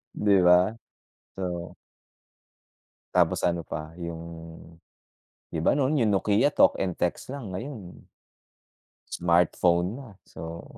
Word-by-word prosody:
'Di 100 -1 +3
ba, 90 +2 +5 0.6
so. 90 -3 -4 1.4
Tapos - - +3
ano 85 -1 -1
pa 80 +1 -7
yung, 85 -1 -6 1.3
'di 80 - -3
ba, - - +4
nun 140 +2 +1
yung 110 -4 +2
Nokia, 105 +7 +2
talk - - +4
and 90 -3 -1
text 90 +8 -2
lang, 135 -8 -6
ngayon 105 -5 -8 1.1
smartphone 85 +3 +2
na, 135 -3 -10 0.2
so. 80 +1 -8
90 Hz, 110 wpm, -26 LUFS, 85-105 Hz, 1.4 s, ba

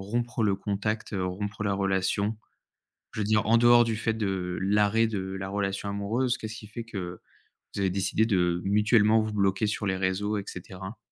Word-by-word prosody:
rompre 120 +3 -2
le 100 -2 +3
contact, 105 +2 -3
rompre 100 +3 -3
la 100 -1 0
relation? 95 +2 0 0.8
Je 110 - -4
veux - - +1
dire 105 +1 +2
en 115 +1 +5
dehors, 120 0 +6
du 115 -1 -1
fait 115 0 -1
de, 95 -4 -2
l'arrêt 105 +3 +3
de 105 -3 -2 0.2
la 95 0 -4
relation 100 0 -2
amoureuse, 115 +6 0
qu'est-ce 110 0 -6
qui 105 - -10
fait 115 +2 -6
que, 90 -6 -6 0.6
vous 100 - -2
avez 95 -2 +1
décidé 100 +3 +1
de 90 -5 +1
mutuellement 105 +2 +4
vous 110 0 -3
bloquer 100 +1 +1
sur 105 0 -2
les 95 -1 0
réseaux 100 +3 -1
et - - -5
cetera? 95 +4 -8
105 Hz, 190 wpm, -27 LUFS, 95-110 Hz, 0.8 s, dehors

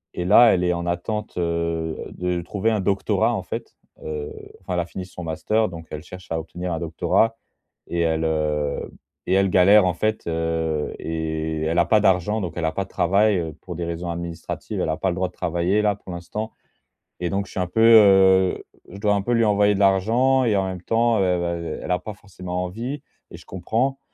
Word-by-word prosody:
et 90 - -3
là 115 +5 +7
elle 90 - +1
est 90 0 +2
en 85 0 -3
attente, 105 +5 -3
heu, 85 -1 -1 0.2
de 90 -1 -2
trouver 100 +5 -1
un 110 - +1
doctorat 100 0 +1
en - - -2
fait, - - -7 0.3
heu, 75 -1 -5 0.3
enfin, 90 - -4
elle - - +1
a - - -4
fini 90 +1 -7
son 90 -1 -9
master, 105 +7 0
donc 85 -2 -10
elle 75 0 -6
cherche 90 +1 -11
à 80 - 0
obtenir 90 +3 -6
un 80 - -2
doctorat 90 +7 +1 0.5
et 85 - -1
elle, 80 -1 +1
heu 75 -2 -1 0.4
et - - +1
elle 95 0 +3
galère 95 +3 +6
en 90 - +1
fait, 110 +3 -1
heu, 80 -2 -1
et 80 -1 -3
elle 80 +2 +1
a 85 - +4
pas 110 -1 +3
d'argent, 95 +2 +2
donc 90 -4 -4
elle 85 - -1
a 80 - +1
pas 100 - -1
de - - -22
travail, 100 +3 +2
heu, 80 -2 -4
pour 90 - -7
des 85 +1 -3
raisons 85 +1 -4
administratives 85 -1 -5
elle - - -1
a 80 - -1
pas 95 - 0
le 90 - -2
droit 95 0 -1
de - - -22
travailler 90 +4 0
là 105 -1 +2
pour 95 -2 -11
l'instant. 105 +6 -5 0.7
Et 90 -1 -1
donc 100 0 -1
je - - -15
suis - - -3
un 90 - 0
peu, 110 +5 +1
heu 95 -4 +6 0.3
je 95 - -9
dois 105 0 +2
un 100 - 0
peu 120 - -1
lui 115 -1 +3
envoyer 105 -1 +3
de 100 - -2
l'argent 115 +7 +3
et 110 -4 +2
en 95 - +1
même 95 -2 -5
temps, 115 +2 +2
heu, - - +3
heu 85 -2 -1
heu, - - -9
elle - - -6
a 90 - +2
pas 105 +3 -7
forcément 90 -3 -6
envie 120 +10 -5 0.3
et - - -9
je - - -16
comprends. 115 +9 -1
90 Hz, 230 wpm, -23 LUFS, 85-105 Hz, 0.7 s, là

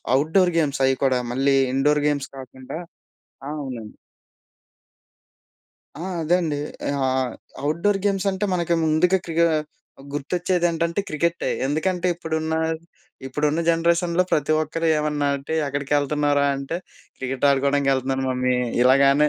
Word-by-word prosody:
Outdoor 160 +6 +3
games 145 -3 0
అవి 135 - +3
కూడా 130 -2 +3
మళ్ళీ 135 +2 +2 0.2
ఇండోర్ 145 +2 +2
గేమ్స్ 140 -2 -1
కాకుండా 130 +2 -8 0.7
ఆ! - - -4
అవునండి. 120 -5 -7 2.1
ఆ! - - -4 0.2
అదే 165 +3 +3
అండి. 155 -4 -1 0.3
ఆహ్, 130 -3 0 0.3
అవుట్‌డోర్ 170 +7 +1
గేమ్స్ 200 -1 +1
అంటే 190 +1 -2
మనకి 170 -1 +1
ముందుగా 175 +4 +3
క్రి‌క్ 165 0 +1 0.7
గుర్తొచ్చేది 175 +5 -1
ఏంటంటే 170 +2 -1
క్రికె‌టె. 170 +2 -1 0.2
ఎందుకంటే 175 +5 0
ఇప్పుడున్న, 160 -1 -2 0.7
ఇప్పుడున్న 150 +4 0
జనరేషన్‌లో 170 +2 +2
ప్రతి 150 +1 +2
ఒక్కరు 165 +2 -1
ఏమన్నంటే 145 -1 -1
ఎక్కడికి 140 +1 -2
ఎళ్తున్నావురా? 145 0 +1
అంటే 140 +5 -4 0.4
"క్రికెట్ 130 +1 -1
ఆడుకోవడానికి 140 0 +2
ఎళ్తున్నాను 135 0 -1
మమ్మీ" 125 0 +1 0.3
ఇలాగానే 140 +3 +5
150 Hz, 120 wpm, -23 LUFS, 135-170 Hz, 2.1 s, ఇలాగానే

